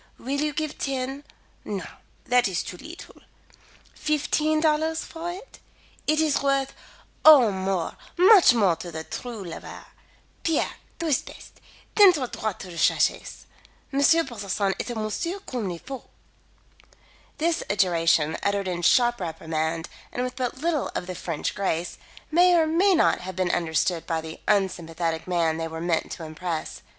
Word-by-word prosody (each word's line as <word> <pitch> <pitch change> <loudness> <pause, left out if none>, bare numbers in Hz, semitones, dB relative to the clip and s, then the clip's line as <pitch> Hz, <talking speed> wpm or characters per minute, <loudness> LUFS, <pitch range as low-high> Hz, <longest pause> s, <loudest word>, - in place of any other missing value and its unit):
Will 280 +3 -2
you 300 0 0
give 305 +1 -4
ten 270 +1 -3 0.4
no, 200 -3 -4 0.4
that 245 -2 +3
is 180 -2 -2
too - - -7
leetle 330 - -11 0.8
fifteen 305 +1 0
dollars 315 +1 +1
for 335 +1 -6
it? 385 +8 -9 0.5
It 310 0 +3
is 310 -3 +2
worth 275 -1 +1 0.5
Oh, 275 -8 +8
more, 190 -2 -2 0.2
much 370 - +7
more 195 -7 +3
to 175 - -7
the 160 0 -5
true 230 +3 -6
lover. 170 -3 -9 0.6
Pierre, 325 -2 0 0.2
tu 335 - -4
es 300 -5 +2
bete. - - -14 0.3
Teins 395 -4 +8
tu 275 -4 -1
droit 220 -4 -4
sur 185 - -8
ta 170 - -9
chaise. - - +1 0.5
M. 275 - +1 0.3
Brotherson 205 -5 -2
est - - -3
un 235 -2 -3
monsieur 335 - -2
comme 235 -7 -3
il 175 - -4
faut." 265 +8 -8 1.3
This 335 +1 0
adjuration, 165 -5 +2
uttered 200 -1 0
in 175 -1 -2
sharp 240 +7 +4
reprimand 160 -1 -3 0.2
and 245 - -2
with 250 0 -4
but 255 -1 -3
little 320 -1 0
of - - -2
the 185 - -5
French 165 -3 -3
grace, 175 -3 -2 0.3
may 355 +2 +5
or 325 - +4
may 360 +5 +3
not - - +3
have 185 0 -7
been 185 -1 0
understood 165 0 0
by 165 -1 0
the 160 0 -9
unsympathetic 170 -5 0
man 165 -3 +1
they 165 0 -3
were 160 0 -6
meant 170 -1 -1
to 165 - -8
impress. 160 +1 -5
215 Hz, 160 wpm, -25 LUFS, -, 1.3 s, Oh